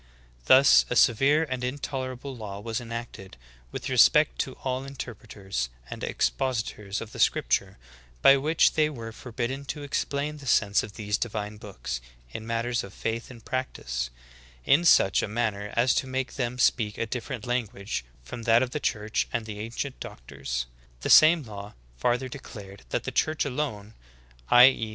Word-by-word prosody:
Thus: 130 +1 +7
'A 125 - -1
severe 135 +7 +4
and 130 -5 -4
intolerable 130 0 -4
law 105 -4 -7
was 115 +2 -3
enacted, 115 - -7 0.3
with - - -5
respect - - +5
to - - -1
all 130 0 -2
inter 135 -3 -6
preters 95 - -5 0.2
and - - -7
expositors 105 - -1
of 115 -1 -8
the - - -9
scriptures, - - +1 0.5
by 135 - +9
which 150 +4 +3
they 155 -1 +2
were 115 -6 -7
forbidden 125 +4 -4
to 145 +1 -5
explain 145 +1 -2
the 140 -2 -11
sense 100 -3 +3
of 105 - -8
these 105 -1 -2
divine 105 -2 -3
books, 100 - -6 0.3
in 110 - -7
matters 115 +1 -1
of 100 - -11
faith 115 +3 -3
and 120 -4 -13
practice, - - -3 0.6
in 165 +5 +4
such 95 - +5
a - - -2
manner 105 -2 -2
as 125 +2 +4
to 135 - 0
make 130 0 -3
them 125 -2 -2
speak 110 -4 +2
a - - -1
different 120 0 -5
language 105 - -2 0.2
from 115 - -8
that 115 +1 +4
of 125 - -4
the 150 - -2
church 105 -5 -1
and 115 -2 -2
the 105 -1 -7
ancient 120 +5 -5
doctors. - - -5 0.4
The - - 0
same 160 0 +8
law 105 -3 -9 0.2
farther 120 - 0
declared 100 - -10
that - - -1
the - - -4
church 155 -1 +1
alone 125 -7 -3 0.6
(i. 125 0 +9
e. 115 -4 +2
115 Hz, 170 wpm, -27 LUFS, 105-130 Hz, 0.6 s, by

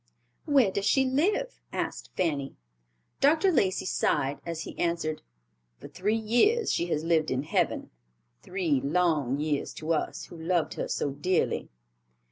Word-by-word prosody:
"Where 275 -10 +4
does 200 +1 -1
she 270 -1 +4
live?" 405 - 0
asked - - -4
Fanny. 145 -6 -1 0.6
Dr. 315 +7 +4
Lacey 195 - +1
sighed 145 -5 0
as 165 -1 -3
he - - -7
answered, 170 -2 -1 0.6
"For - - -10
three 210 +4 0
years 245 - +3
she 170 - 0
has 155 -2 -1
lived 165 -2 +2
in 130 +1 -1
heaven; - - -1 0.5
three 170 -8 0
long 145 -4 +1
years 150 -1 -1
to 160 +1 -1
us, 155 - -2
who - - -12
loved 170 0 0
her - - -3
so 145 - -1
dearly." 170 +6 0
175 Hz, 145 wpm, -28 LUFS, 155-230 Hz, 0.6 s, Where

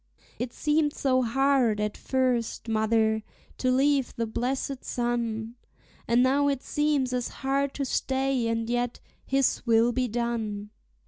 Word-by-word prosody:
It 245 0 -3
seemed 300 +1 +1
so 255 -2 +1
hard 255 -2 +2
at 210 0 -1
first, 250 -3 -1
mother, 220 0 +2 0.4
to 255 - +1
leave 270 +1 +2
the 230 - -1
blessed 255 +4 -2
sun, 235 -2 -2 0.5
And 240 +1 +4
now 280 +2 +3
it 275 -2 -1
seems 295 -4 0
as 250 -1 -1
hard 275 +1 -1
to 280 - -2
stay; 265 -2 0
and 230 0 -1
yet, 245 0 -1 0.3
His 270 0 +2
will 230 +1 +4
be 255 +1 0
done! 220 -3 -3
245 Hz, 140 wpm, -27 LUFS, 230-270 Hz, 0.5 s, And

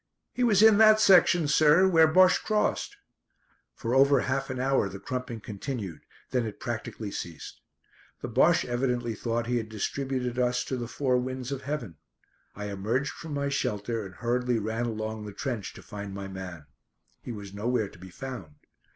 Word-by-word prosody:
"He 250 - -1
was 215 -4 +5
in 220 -1 +7
that 215 -1 +7
section, 175 -5 +5
sir, 155 +5 +5
where 165 -3 +6
Bosche 185 +3 +5
crossed." 215 - 0 0.8
For 115 +1 -3
over 135 0 +5
half 135 +2 -2
an 130 -1 -4
hour 130 -6 +1
the 95 - -7
crumping 125 +1 -5
continued, 105 - -5 0.3
then 125 -2 +1
it 105 - -8
practically 115 -3 -5
ceased. 85 -4 -7 0.6
The - - -4
Bosche 145 +8 +3
evidently 120 -1 -1
thought 115 +2 -2
he 120 +1 0
had 110 -2 -4
distributed 125 +3 -2
us 125 0 +1
to 130 - -3
the 120 -2 -4
four 130 0 0
winds 130 +1 -4
of 135 -1 -3
heaven. 130 - -5 0.6
I 105 0 -5
emerged 110 +8 -1
from 160 -3 -7
my 140 0 -1
shelter 110 -3 -2
and 95 -1 -10
hurriedly 125 0 0
ran 110 +2 -2
along 110 -1 -4
the 105 - -8
trench 115 -3 -4
to - - -13
find 100 -2 -7
my 100 0 -5
man. 95 -5 -8 0.6
He - - -7
was 100 -3 -8
nowhere 110 +1 0
to - - -17
be 95 +1 -11
found. 105 - -8
125 Hz, 175 wpm, -28 LUFS, 105-135 Hz, 0.8 s, in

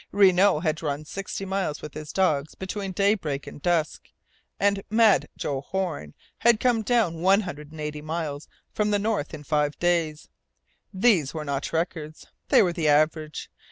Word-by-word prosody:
Renault 190 -3 +4
had 160 -1 -1
run 150 -1 -3
sixty 195 +3 -5
miles 190 -6 -2
with 150 - -7
his 155 -1 -7
dogs 155 -6 +1
between 195 +1 -5
daybreak 185 -8 0
and - - -10
dusk, 165 -2 -1 0.5
and 200 0 +2
"Mad" 220 -2 +4
Joe 135 -2 -2
Horn 160 - -4 0.2
had 235 -2 +4
come 240 -2 +2
down 215 -8 +1
one 195 +3 +5
hundred 150 -6 -8
and 160 - -11
eighty 150 0 -4
miles 155 -2 -4 0.3
from 210 0 0
the 205 - +2
North 205 -7 -1
in 155 -2 -8
five 150 0 0
days. 170 -3 0 0.6
These 185 - +2
were 155 -1 -4
not 140 -1 -3
records. 160 -2 -3 0.2
They - - +6
were 175 -2 0
the 165 -2 -1
average. 155 +1 +1
165 Hz, 165 wpm, -25 LUFS, 150-195 Hz, 0.6 s, They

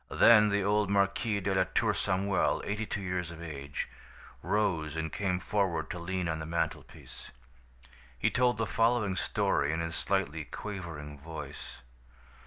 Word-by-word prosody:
Then 105 -2 +7
the 100 -1 +1
old 105 0 +2
Marquis 100 +2 +1
de 95 +1 0
la 95 -1 +3
Tour 110 -2 +3
Samuel, 100 -1 +1
eighty 105 +1 -2
two 100 - -3
years 90 -2 -2
of 80 -1 -9
age, 75 -4 -5 0.5
rose 85 -8 0
and 80 -1 -3
came 90 -3 0
forward 90 -6 0
to 90 - -5
lean 90 +1 -2
on 80 -1 -1
the 80 - -5
mantelpiece. 80 -2 -4 0.9
He - - +1
told 125 -2 +2
the 115 - 0
following 115 -3 +2
story 70 -5 +1
in 80 - -1
his 85 0 -3
slightly 85 -6 -1
quavering 85 -9 -7
voice. 75 -4 -8
95 Hz, 155 wpm, -30 LUFS, 80-100 Hz, 0.9 s, Then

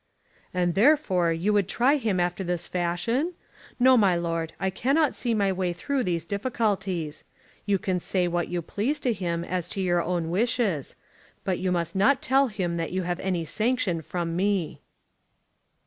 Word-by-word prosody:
"And 175 -1 0
therefore 195 - +3
you 175 +6 0
would 200 -3 +2
try 260 +8 +3
him 215 -8 0
after 175 +2 0
this 175 -1 -2
fashion? 180 - -1 0.4
No, 260 +1 +6
my 200 -6 +4
Lord; 165 -1 -2
I 190 -1 0
cannot 275 - +1
see 235 -2 0
my 200 -2 +2
way 185 -2 -1
through 270 +10 -1
these 170 -5 -1
difficulties. 195 -6 -2 0.4
You 200 -1 +3
can 185 0 -1
say 180 0 0
what 175 0 -1
you 175 -1 -3
please 245 - -2
to 245 - +1
him 170 -4 -2
as 180 -1 -3
to - - -5
your 175 -2 +2
own 170 -1 -2
wishes. 205 - 0 0.5
But 185 -2 -1
you 185 0 0
must 170 0 -1
not 250 +8 +4
tell 270 +1 +3
him 185 -6 -2
that 165 -1 -3
you 185 0 -1
have 175 0 -2
any 180 -3 -1
sanction 215 - 0
from 165 +1 -3
me." 190 -3 0
185 Hz, 175 wpm, -26 LUFS, 175-220 Hz, 0.5 s, No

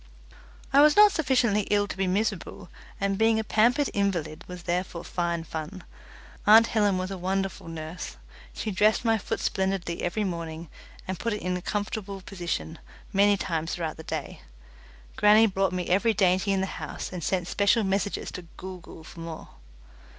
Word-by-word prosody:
I 280 - +7
was 300 0 +6
not 420 0 +8
sufficiently 250 - +1
ill 205 0 +2
to - - -5
be 190 0 0
miserable, 195 -1 -2 0.3
and 195 0 0
being 225 0 +4
a 220 - 0
pampered 240 +7 +2
invalid 175 -6 -1
was 180 -1 -8
therefore 175 -1 -2
fine 170 -1 -2
fun. 165 +3 -6 0.6
Aunt 220 +2 +9
Helen 205 -4 +2
was 185 +1 -3
a 190 - -5
wonderful 195 0 -2
nurse. 165 +1 -7 0.3
She 215 - -4
dressed 215 +4 +2
my 225 -1 +3
foot 225 - -3
splendidly 190 -3 -1
every 210 +5 -1
morning, 165 -3 -5 0.4
and 185 -1 -4
put 230 0 -1
it 210 - -5
in 180 0 -1
a 180 - -4
comfortable 205 0 -3
position 175 -3 -4 0.3
many 200 +1 +4
times 165 -3 -2
throughout 165 -3 -4
the - - -8
day. - - -5 0.8
Grannie 210 +2 +6
brought 195 -2 +1
me 180 -1 -2
every 210 +5 +2
dainty 190 0 +2
in 195 -1 +1
the - - +1 0.2
house, - - -6
and 175 -3 -5
sent 180 0 -1
special 205 +4 +2
messengers 195 0 -1
to 175 -2 -8
Gool 185 -1 -7
Gool 165 -1 -13
for 165 - -12
more. 165 -1 -7
195 Hz, 175 wpm, -27 LUFS, 175-210 Hz, 0.8 s, Aunt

